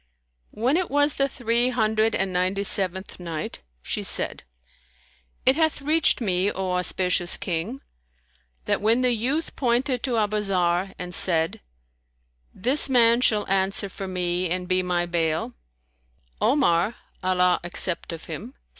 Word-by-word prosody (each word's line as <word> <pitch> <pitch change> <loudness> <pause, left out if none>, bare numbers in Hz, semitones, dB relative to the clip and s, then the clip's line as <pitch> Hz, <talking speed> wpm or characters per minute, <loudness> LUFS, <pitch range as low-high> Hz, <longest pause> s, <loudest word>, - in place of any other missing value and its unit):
When 250 +8 0
it 365 -1 -1
was 290 +1 +3
the 275 0 0
Three 240 -1 0
Hundred 220 -2 +1
and 190 -1 -1
Ninety 185 +2 0
seventh 190 -1 0
Night, 165 -3 -6 0.2
She - - -3
said, - - 0 1.0
It 260 - +5
hath 315 -1 +1
reached 305 +2 +2
me, 195 -3 +1
O 190 -1 -3
auspicious 180 0 +1
King, 185 +10 -4 0.8
that - - 0
when 225 +4 +3
the 250 -1 +3
youth 265 +8 -2
pointed 250 0 0
to 250 -4 -1
Abu 215 -1 0
Zarr 185 -2 0
and 180 0 -7
said, 165 -3 +2 0.9
"This 265 +8 +1
man 235 -2 +4
shall 210 -4 +3
answer 195 +1 0
for 195 0 -7
me 180 -1 -1
and 180 +1 -3
be 185 0 +2
my 175 -1 -1
bail," 165 -6 -1 0.9
Omar 220 - +2 0.3
(Allah 180 -1 +2
accept 175 0 -1
of 165 -1 -8
him!) 215 - -8
195 Hz, 140 wpm, -24 LUFS, 180-245 Hz, 1.0 s, It